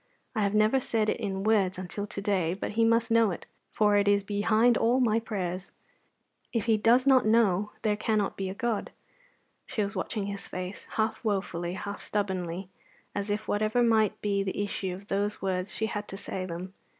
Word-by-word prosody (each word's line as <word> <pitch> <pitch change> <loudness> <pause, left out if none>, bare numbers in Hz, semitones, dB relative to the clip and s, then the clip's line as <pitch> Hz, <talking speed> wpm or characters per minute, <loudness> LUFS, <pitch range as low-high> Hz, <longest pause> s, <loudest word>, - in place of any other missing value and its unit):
I 220 - 0
have 200 0 +1
never 215 +5 +4
said 220 -4 0
it - - -1
in 195 -3 -3
words 205 -3 +2
until 185 +3 -5
to 205 -1 -5
day, 185 -4 +1
but 200 - -4
He 225 +2 +2
must 230 0 +3
know 230 -2 +5
it, 175 - -5 0.2
for 210 -1 +3
it 200 0 +2
is 205 0 +4
behind 215 +4 +3
all 240 +4 +3
my 225 -3 +3
prayers. 190 -4 -4 0.8
If 230 -3 -1
He 225 -1 +4
does 230 +4 +4
not 265 -2 +6
know, 210 -3 +3
there 210 -2 +2
cannot 215 -1 0
be 195 -1 -3
a 190 - -5
God." 235 -2 -1 0.8
She 215 - -1
was 200 +2 -4
watching 200 +2 -2
his 200 0 -5
face, 185 +2 -6
half 220 0 0
wofully, 190 -5 -1
half 200 +2 -5
stubbornly, 190 -3 -2 0.5
as 200 +1 -3
if, 210 +1 -2
whatever 215 +3 +2
might 220 -3 +3
be 200 -1 +1
the 195 +1 -2
issue 190 -2 -3
of 195 +2 -12
those 205 +1 -1
words, 185 0 -1
she 220 - 0
had 210 -2 -4
to 195 - -7
say 185 -2 -4
them. 180 +2 -6
205 Hz, 200 wpm, -28 LUFS, 195-220 Hz, 0.8 s, not